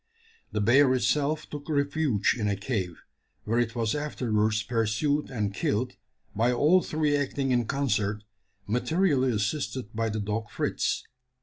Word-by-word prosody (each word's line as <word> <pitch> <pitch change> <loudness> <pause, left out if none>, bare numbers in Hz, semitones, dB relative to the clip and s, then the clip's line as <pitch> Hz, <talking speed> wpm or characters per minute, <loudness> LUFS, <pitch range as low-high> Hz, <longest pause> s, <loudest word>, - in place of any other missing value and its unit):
The 105 - -1
bear 130 +5 +5
itself 145 +5 0
took 145 +1 -8
refuge 140 -6 +1
in 110 -4 -1
a 100 - +1
cave, 95 -5 -3 0.4
where 115 +2 0
it 120 -1 0
was 115 -2 0
afterwards 110 -7 0
pursued 120 +6 0
and 105 -6 -2
killed, 125 +5 -1 0.4
by 115 +4 +3
all 150 +9 +4
three 155 -3 0
acting 140 -1 -1
in 120 -2 +2
concert, 105 -6 0 0.4
materially 130 - +2
assisted 115 +2 -2
by 115 0 0
the 110 0 -2
dog 105 +1 -3
Fritz. - - -1
120 Hz, 140 wpm, -27 LUFS, 105-145 Hz, 0.4 s, bear